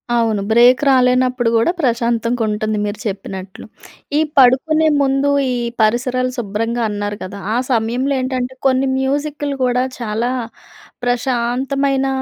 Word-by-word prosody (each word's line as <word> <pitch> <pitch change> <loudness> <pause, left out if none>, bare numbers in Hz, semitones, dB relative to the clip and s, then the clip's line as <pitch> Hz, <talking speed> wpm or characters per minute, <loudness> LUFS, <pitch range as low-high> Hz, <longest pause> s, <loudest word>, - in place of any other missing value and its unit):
అవును. 225 -3 +1
బ్రేక్ 245 +4 +5
రాలేనప్పుడు 255 -1 +3
కూడా 230 +9 +3
ప్రశాంతంగా 235 -3 0
ఉంటుంది 215 0 -2
మీరు 205 0 -4
చెప్పినట్లు. 190 -1 -7 0.5
ఈ - - +4 0.2
పడుకునే 280 +5 +4
ముందు 275 +1 +1 0.2
ఈ - - -1 0.3
పరిసరాలు 255 +3 +1
శుభ్రంగా 230 +2 -2
అన్నారు 205 0 -4
కదా! 185 +2 -7 0.2
ఆ - - 0 0.2
సమయంలో 245 +4 0
ఏంటంటే 255 0 -2
కొన్ని 265 0 +2
మ్యూజిక్‌లు 285 +1 -2
కూడా 250 0 +1 0.2
చాలా 230 +1 -2 0.7
ప్రశాంతమైన 260 +3 0
245 Hz, 120 wpm, -18 LUFS, 225-265 Hz, 0.7 s, బ్రేక్